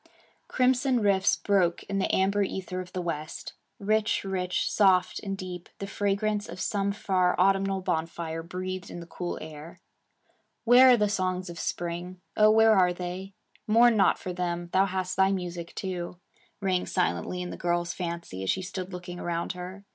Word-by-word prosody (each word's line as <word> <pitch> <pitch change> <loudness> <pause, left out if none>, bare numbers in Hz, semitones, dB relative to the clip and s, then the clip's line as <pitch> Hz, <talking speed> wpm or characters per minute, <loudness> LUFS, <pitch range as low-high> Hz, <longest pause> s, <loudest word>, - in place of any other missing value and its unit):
Crimson 255 0 +2
rifts 200 -3 +3
broke 185 -4 +1
in 195 0 -2
the 190 - 0
amber 200 +2 +2
ether 185 -1 -3
of 180 0 -10
the 180 - -3
west. 155 -2 -5 0.2
Rich, 215 +1 +1
rich, 185 -2 -1
soft, 190 -3 +3
and 195 -1 -4
deep, 180 -2 -7
the 200 - -5
fragrance 205 +1 -1
of 175 +2 -8
some 200 0 0
far 185 -3 +1
autumnal 195 0 +2
bonfire 165 -2 -2
breathed 185 +2 -5
in - - -7
the 170 - -8
cool 175 +1 -5
air. 155 +1 -10 0.8
'Where 245 +2 +8
are 250 - +7
the 210 -1 +2
songs 185 -2 -1
of 170 - -9
spring? 175 +2 -4 0.2
oh, 215 0 +6
where 220 0 +6
are 180 -2 +4
they? 185 +2 -6 0.3
Mourn 230 +2 +5
not 200 - +4
for 180 - -5
them, 175 -1 -3
thou 190 +1 +4
hast 185 -1 -3
thy 190 0 +4
music, 175 -3 -4
too,' 180 -2 -4 0.4
rang 185 -2 0
silently 85 - -1
in 180 - -6
the - - -5
girl's 175 0 -1
fancy 170 - -5
as 95 - -3
she 190 - 0
stood 185 0 -5
looking 180 0 -7
around 170 0 -2
her. 185 +2 -8
185 Hz, 175 wpm, -27 LUFS, 175-200 Hz, 0.8 s, Where